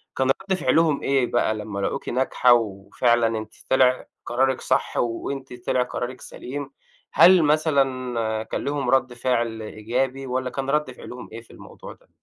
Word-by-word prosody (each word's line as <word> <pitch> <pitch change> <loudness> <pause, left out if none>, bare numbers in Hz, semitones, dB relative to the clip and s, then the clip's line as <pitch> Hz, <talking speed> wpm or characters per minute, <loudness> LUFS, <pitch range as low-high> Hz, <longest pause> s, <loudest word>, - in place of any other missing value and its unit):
كان 130 - +1
رد 195 0 -1
فعلهم 160 -5 +2
إيه 135 -2 +2
بقى 110 -2 +1
لمّا 105 -2 -5
لاقوكِ 100 +7 -3
ناجحة 125 -1 +3
وفعلًا 115 +2 +1
أنتِ 110 0 -7 0.2
طلع 130 -1 +3 0.2
قرارِك 130 +1 +1
صح، - - 0
وأنتِ 130 +3 -3
طلع 125 - +2
قرارِك 125 +1 -5
سليم؟ 140 +2 -7 0.4
هل 180 -1 +7
مثلًا 130 -7 +1
كان - - -4
ليهم 140 0 -1
رد 130 -1 +2
فعل 120 -2 -1
إيجابي، 125 +5 -3
والّا 130 0 -2
كان 135 +1 -4
رد 150 -1 0
فعلهم 125 0 -10
إيه 115 +1 -8
في 115 - -20
الموضوع - - -12
ده؟ - - -27
125 Hz, 155 wpm, -23 LUFS, 115-135 Hz, 0.4 s, هل